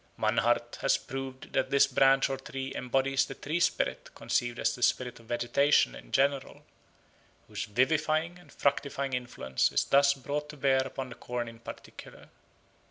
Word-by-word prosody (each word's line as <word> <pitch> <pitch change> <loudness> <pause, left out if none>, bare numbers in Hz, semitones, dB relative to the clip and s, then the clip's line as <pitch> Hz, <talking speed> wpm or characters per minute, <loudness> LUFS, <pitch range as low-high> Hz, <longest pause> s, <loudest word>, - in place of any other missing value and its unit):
Mannhardt - - +1
has - - +2
proved 135 -1 -7
that 135 - +1
this 140 0 +5
branch 135 0 +4
or 135 - -3
tree 135 0 -6
embodies 135 +2 0
the 135 - -7
tree 155 +6 -3
spirit 170 - 0
conceived 120 -1 -1
as - - +1
the 125 - -9
spirit 125 0 +1
of 115 - -18
vegetation 120 - +2
in - - -12
general, 140 0 0 0.8
whose - - -4
vivifying 155 +8 +1
and 155 -5 -18
fructifying 140 -1 -1
influence 120 - -1
is - - +1
thus 140 0 +4
brought 145 +2 -4
to 150 - -9
bear 135 -1 +3
upon 130 0 -6
the 120 - -9
corn 120 -1 -4
in 115 0 -11
particular. - - -11
135 Hz, 165 wpm, -29 LUFS, 125-140 Hz, 0.8 s, this